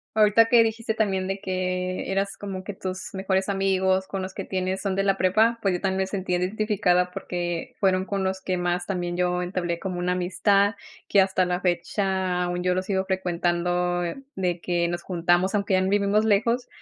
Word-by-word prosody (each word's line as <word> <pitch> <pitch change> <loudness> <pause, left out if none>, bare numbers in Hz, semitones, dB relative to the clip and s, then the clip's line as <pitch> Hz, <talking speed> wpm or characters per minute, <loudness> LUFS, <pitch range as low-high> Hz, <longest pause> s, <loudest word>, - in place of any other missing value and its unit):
Ahorita 215 +1 +5
que 230 0 +6
dijiste 225 0 -2
también 195 -4 0
de 195 +1 -3
que 185 0 -2
eras 195 +1 -1
como 195 -2 -6
que 205 - -6
tus 185 0 -6
mejores 190 0 0
amigos 190 -1 +1
con 195 -1 -4
los 185 0 -6
que 195 - -5
tienes 185 0 -2
son 195 -2 -1
de 195 - +1
la 195 -1 +2
prepa, 220 +6 +3
pues, 195 -3 +1
yo 180 - -4
también 190 -1 0
me 190 - 0
sentí 190 -2 -3
identificada, 180 -1 +1
porque 175 -3 -4
fueron 190 -1 +2
con 195 -1 -2
los 190 0 -2
que 185 -1 -1
más 175 0 -1
también 175 -2 -2
yo 180 0 +1
entablé 175 -2 -2
como 185 -2 -4
una 180 +1 0
amistad. 195 +3 +2 0.3
Que 200 - +5
hasta 190 -1 +2
la 180 +1 -1
fecha 185 0 0
aún 175 0 -2
yo 180 0 +2
los 185 +1 -2
sigo 190 -1 0
frecuentando 175 -1 0 0.3
de 180 -2 -1
que 175 -1 0
nos 175 0 -4
juntamos, 175 +1 +1
aunque 200 -2 +1
ya 185 - +3
vivimos 200 +2 +2
lejos, 230 +4 +2
190 Hz, 195 wpm, -25 LUFS, 180-195 Hz, 0.3 s, que